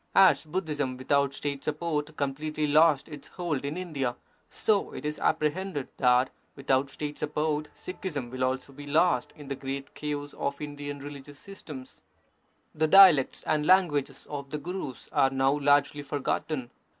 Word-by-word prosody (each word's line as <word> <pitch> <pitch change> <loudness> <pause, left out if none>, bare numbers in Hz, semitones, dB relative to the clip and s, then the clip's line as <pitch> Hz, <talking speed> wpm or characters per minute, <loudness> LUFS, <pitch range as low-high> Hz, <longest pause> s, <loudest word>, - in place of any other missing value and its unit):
As 190 -4 +6
Budhism 150 -6 -2
without 140 +1 +2
State 140 0 -4
support 155 -1 -2
completely 150 +2 -2
lost 150 -1 +4
its 145 -2 -10
hold 170 -7 -3
in 145 +4 -3
India, 140 -9 -2 0.3
so 210 -3 +1
it - - -7
is 150 0 -2
apprehended 160 -1 0
that 125 0 +4 0.2
without 135 0 +1
State 150 +1 -5
sup 150 - -4
port 150 0 0
Sikhism 150 -9 -5
will 130 0 -2
also 130 +2 -2
be 145 +1 -10
lost 155 -3 +2
in 145 -2 -11
the 140 - -2
great 135 +1 -6
chaos 145 -1 -4
of 140 0 -3
Indian 145 -1 -6
religious 145 0 -9
systems. 150 -8 -10 0.7
The 155 +1 +1
dialects 180 -7 +7
and 155 -1 +1
languages 145 -8 +3
of 140 -2 -6
the 150 - -3
Gurus 155 -4 -6
are 135 - +4
now 135 +1 +2
largely 145 0 +3
forgotten. 145 -2 -2
145 Hz, 155 wpm, -28 LUFS, 140-155 Hz, 0.7 s, dialects